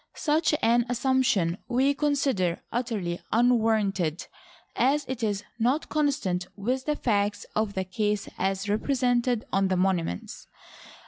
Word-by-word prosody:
Such 310 0 +2
an 240 +1 +4
assumption 240 -9 +1
we 265 +3 +2
consider 275 - 0
utterly 215 -8 -2
unwarranted, 215 -8 +2 0.5
as 280 +4 +2
it 260 -2 -4
is 205 -2 -1 0.2
not 255 +7 +1
consonant 230 -12 0
with 250 +6 -2
the 300 - 0
facts 205 -6 0
of 215 -2 0
the 190 - 0
case 210 +2 -1
as 195 +1 -1
represented 245 +1 +1
on 195 0 +3
the 185 -1 0
monuments. 180 - -1
220 Hz, 125 wpm, -27 LUFS, 195-260 Hz, 0.5 s, an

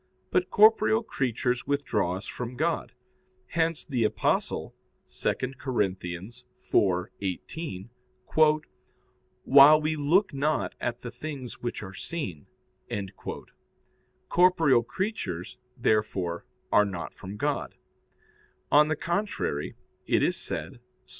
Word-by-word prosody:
But 370 - +2
corporeal 220 +1 +5
creatures 125 - -1
withdraw 110 -10 0
us 95 - -7
from 125 0 -6
God. 160 +5 -1 0.6
Hence 165 -1 0
the 125 -5 0
Apostle 105 - 0 0.3
(2 - - -1 0.3
Cor. 130 -2 -4
4:18): 95 - -2 1.5
"While 140 +3 +8
we 155 +1 0
look 160 +7 +2
not 145 +2 0
at 120 0 -2
the 120 - -5
things 140 -3 -7
which 120 -3 -4
are 95 -2 -8
seen." 95 - -5 1.8
Corporeal 165 -8 +4
creatures, 120 - -4 0.2
therefore, 100 -7 0 0.2
are 105 - +6
not 95 -4 -5
from 100 +1 -9
God. - - -2 1.0
On 150 +1 +7
the 155 - 0
contrary, 170 - -2 0.3
It - - +3
is - - +2
said - - -5 0.3
(Ps. - - -20
125 Hz, 105 wpm, -27 LUFS, 100-155 Hz, 1.8 s, While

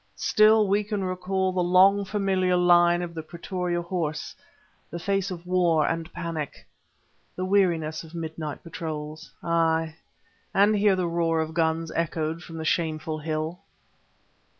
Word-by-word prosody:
Still 215 0 +4
we 200 +2 +2
can 205 -1 -3
recall 185 +1 -1
the 185 0 0
long 190 +3 +5
familiar 190 -2 +1
line 175 0 +4
of 170 -1 -6
the 160 - -5
Pretoria 175 +1 -3
Horse, 165 -4 -3 0.5
the 170 - -5
face 195 +2 -1
of 175 -2 -7
war 175 -4 +2
and 165 0 -3
panic, 165 -4 -5 0.7
the 185 - -3
weariness 170 -5 +1
of 165 +1 -12
midnight 160 -2 -5
patrols; 155 -2 -6
aye, 165 -1 +1 0.6
and 205 +2 +5
hear 205 -1 +4
the 185 -1 -1
roar 165 -1 0
of 160 0 -2
guns 165 0 0
echoed 165 0 -2
from 165 -2 -9
the 160 - -5
Shameful 155 -1 -1
Hill. 155 +2 -3
170 Hz, 145 wpm, -26 LUFS, 160-185 Hz, 0.7 s, long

